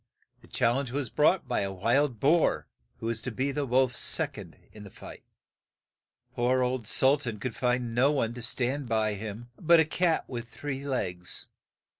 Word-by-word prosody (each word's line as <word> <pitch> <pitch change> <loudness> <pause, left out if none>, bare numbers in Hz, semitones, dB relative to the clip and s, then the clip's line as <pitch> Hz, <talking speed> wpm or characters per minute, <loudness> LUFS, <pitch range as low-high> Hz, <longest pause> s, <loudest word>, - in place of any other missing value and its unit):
The - - -18
chal 120 +2 +1
lenge 140 -2 -2
was 135 0 -3
brought 160 +5 +3
by - - 0
a 100 -1 -2
wild 120 +6 +1
boar, 160 +6 +3 0.3
who - - -8
was 115 -1 -2
to - - -3
be 130 +4 -1
the 145 0 -2
wolf's 125 0 +2
sec - - 0
ond - - -10
in 105 - -12
the 100 - -10
fight. - - -12 1.1
Poor 125 +1 +2
old 125 -3 -2
Sul 135 +5 +4
tan 120 -6 -4
could 115 +2 -4
find 125 -2 0
no 130 +5 +4
one 120 -6 0
to 125 - -7
stand 125 +3 -1
by 110 -1 +1
him 110 +3 -7
but 170 0 +5
a 160 - +5
cat 165 +1 +1
that - - -11
had 120 -1 -3
but - - -26
three 140 -1 -5
legs. 90 -9 -2
125 Hz, 200 wpm, -28 LUFS, 115-140 Hz, 1.1 s, but